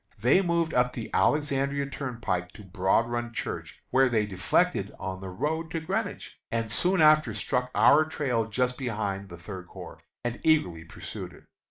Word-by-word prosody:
They 125 - +4
moved 170 -3 0
up 125 0 +2
the 115 -2 -6
Alexandria 140 -1 +1
Turnpike 120 -10 -3
to 105 - -12
Broad 95 +4 +1
Run 120 0 -3
Church, - - -6
where 130 0 +4
they 110 -3 +2
deflected 95 -4 +1
on 95 0 -5
the 95 - -6
road 160 - -2
to 165 - -2
Greenwich, 195 +6 -4
and 115 -1 -2
soon 180 - +3
after 155 -7 +5
struck 125 +4 -1
our 150 +2 +6
trail 130 -7 -1
just 125 +3 -1
behind 105 -6 -3
the 85 - -9
Third 90 +1 -8
Corps, - - -10 0.3
and 120 0 -2
eagerly 90 - +2
pursued - - -8
it. - - -16
125 Hz, 170 wpm, -27 LUFS, 100-150 Hz, 0.3 s, our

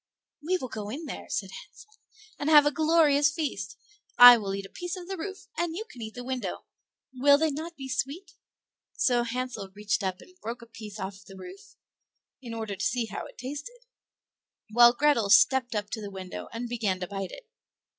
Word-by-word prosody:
"We 360 +5 0
will 260 - -5
go 210 -2 -6
in 295 +9 -6
there," 285 - -7
said 195 -2 -3
Hansel, 425 - -13 0.5
"and 290 - -1
have 295 -2 +8
a 295 - +3
glorious 310 -2 +4
feast. 305 -1 -4 0.4
I 245 0 +12
will 200 -4 -3
eat 195 0 -5
a - - -11
piece 355 +1 -5
of 355 -1 -9
the 385 - -4
roof, 385 +3 -7
and 340 -1 -2
you 435 +5 -5
can 245 - -12
eat 220 +1 -7
the 245 - -6
window. 255 0 -4 0.5
Will 280 +2 +5
they 315 +1 +1
not 320 +4 -6
be 270 -1 -7
sweet?" 275 +8 -3 0.6
So 245 -2 +2
Hansel 240 -4 -4
reached 210 +1 -1
up 185 -2 -2
and 365 - -17
broke 235 +1 -6
a - - -11
piece 220 -2 -10
off 190 +1 -6
the 195 0 -13
roof, 395 - -12 0.7
in 235 -3 -7
order 220 -3 -4
to 195 - -5
see 245 +1 0
how 220 - -6
it - - -17
tasted; 290 - -7 0.9
while 240 +1 +7
Grethel 245 -5 +2
stepped 245 +6 +5
up 210 0 -3
to 220 - -4
the 205 - -6
window 190 -2 -7
and 235 +1 -5
began 215 -6 -1
to 180 - -3
bite 195 -1 -5
it. - - -11
245 Hz, 205 wpm, -27 LUFS, 210-300 Hz, 0.9 s, I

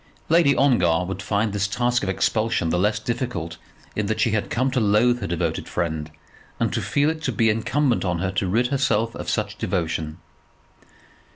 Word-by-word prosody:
Lady 160 -4 +5
Ongar 90 -11 +3
would 95 +1 -5
find 105 0 0
this 100 0 0
task 120 +4 0
of 95 - -2
expulsion 110 -3 0
the 90 - +1
less 105 +3 +2
difficult 110 -7 -3 0.4
in 105 -1 -1
that 110 - -1
she 115 - +2
had 105 -1 -1
come 130 +3 0
to 130 - +1
loathe 115 +3 +3
her - - -2
devoted 85 -1 -2
friend, 80 -3 -2 0.5
and - - 0
to - - 0
feel 145 +2 +1
it 160 -1 -7
to 135 - -1
be 115 0 +3
incumbent 120 +4 +1
on 90 -2 0
her 95 +2 -1
to 95 0 -1
rid 120 +7 +1
herself 115 -5 +1
of - - -6
such 105 -1 -2
devotion. 80 -4 -2
110 Hz, 190 wpm, -23 LUFS, 90-125 Hz, 0.5 s, Lady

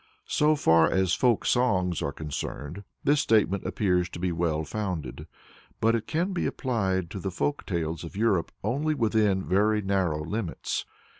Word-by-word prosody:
So 150 +1 +3
far 80 - +4
as 95 -2 +2
folk 120 0 +2
songs 95 -9 +2
are 70 - -1
concerned, 75 +4 -6 0.2
this 145 +1 +3
statement 100 -4 +2
appears 90 -3 +1
to - - -8
be 90 0 0
well 80 -2 0
founded, 85 - -4 0.5
but 115 +1 +3
it 115 -2 -1
can 175 +5 -1
be 180 - 0
applied 95 - -1
to 100 - -5
the 95 - -3
folk 145 +10 -2
tales 85 -3 -2
of 85 +3 -8
Europe 100 -5 +1
only 145 +9 0
within 110 -6 +2
very 105 +3 +2
narrow 90 -6 0
limits. 100 0 -3
95 Hz, 160 wpm, -27 LUFS, 85-115 Hz, 0.5 s, far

